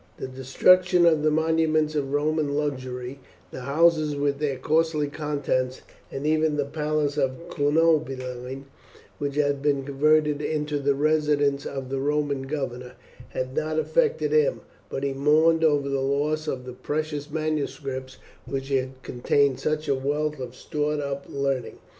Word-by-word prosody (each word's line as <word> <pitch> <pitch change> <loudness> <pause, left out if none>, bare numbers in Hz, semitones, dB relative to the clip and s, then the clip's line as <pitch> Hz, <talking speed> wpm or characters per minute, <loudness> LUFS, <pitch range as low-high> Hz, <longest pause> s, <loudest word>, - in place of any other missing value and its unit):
The - - -5
destruction 175 +8 +4
of 160 -3 +4
the 155 - +3
monuments 155 0 +2
of 140 -3 -2
Roman 150 0 0
luxury; 130 -3 -3 0.3
the - - -7
houses 155 +3 +2
with 140 0 0
their 145 -3 -1
costly 155 +2 +1
contents; 140 -4 -2 0.3
and 135 +2 -5
even 155 -1 +2
the 145 - +1
Palace 150 0 -1
of 130 -2 0
Cunobeline, 135 -4 0 0.5
which 140 -1 -2
had 145 -1 +1
been 140 -1 +1
converted 150 +2 +2
into 150 -1 -1
the 140 0 +1
residence 145 -1 +1
of 135 -2 -5
the 135 - -1
Roman 145 -1 -1
governor, 125 -4 -4 0.4
had 130 +1 -4
not 155 0 -1
affected 470 - +1
him; 460 +2 +2 0.3
but 135 - -4
he 140 -1 0
mourned 155 +4 +3
over 145 -3 +3
the 140 -1 -1
loss 150 +3 0
of 130 -3 -3
the 125 - -7
precious 150 +2 -3
manuscripts 140 -4 -3 0.3
which 135 0 -4
had 130 -1 -2
contained 130 +2 +1
such 155 0 -1
a 140 - +3
wealth 145 +2 -1
of 125 -1 -6
stored 150 +1 -2
up 140 -1 -4
learning. 135 -3 -2
145 Hz, 150 wpm, -25 LUFS, 135-155 Hz, 0.5 s, destruction